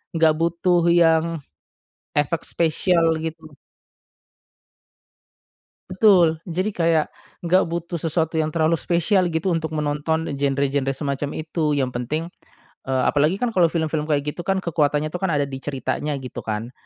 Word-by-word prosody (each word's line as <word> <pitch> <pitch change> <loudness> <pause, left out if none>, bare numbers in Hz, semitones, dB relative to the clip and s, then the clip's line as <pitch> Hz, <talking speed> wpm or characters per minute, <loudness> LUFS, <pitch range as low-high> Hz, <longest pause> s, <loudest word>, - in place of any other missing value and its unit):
nggak 160 -1 +5
butuh 170 +1 +2 0.2
yang, 165 -1 +4 1.0
efek 160 +3 -1
spesial, 170 +1 +2 0.2
gitu. 160 0 -5 2.5
Betul, 185 -4 +4
jadi 185 +4 -2
kayak 165 -2 +2 0.4
nggak 185 +3 +4
butuh 170 +1 -4
sesuatu 165 0 -1
yang 155 -1 0
terlalu 160 0 +2
spesial 175 +2 +1
gitu 165 +2 0
untuk 160 -1 -3
menonton 150 +1 -1
genre-genre 140 0 0
semacam 140 +1 -3
itu, 155 -1 -2
yang 130 -2 -2
penting 150 +7 -2 0.6
eee, 130 -1 +1
apalagi 150 +5 +2
kan 235 +3 -1
kalau 180 -5 +4
film-film 160 -2 -2
kayak 145 -2 +1
gitu - - -16
kan 190 -1 0
kekuatannya 150 -2 0
tuh 180 - -4
kan 190 - 0
ada 145 - +2
di 135 -1 -6
ceritanya 145 +1 -3
gitu 130 -2 -7
kan 110 +2 -4
160 Hz, 140 wpm, -22 LUFS, 145-170 Hz, 2.5 s, nggak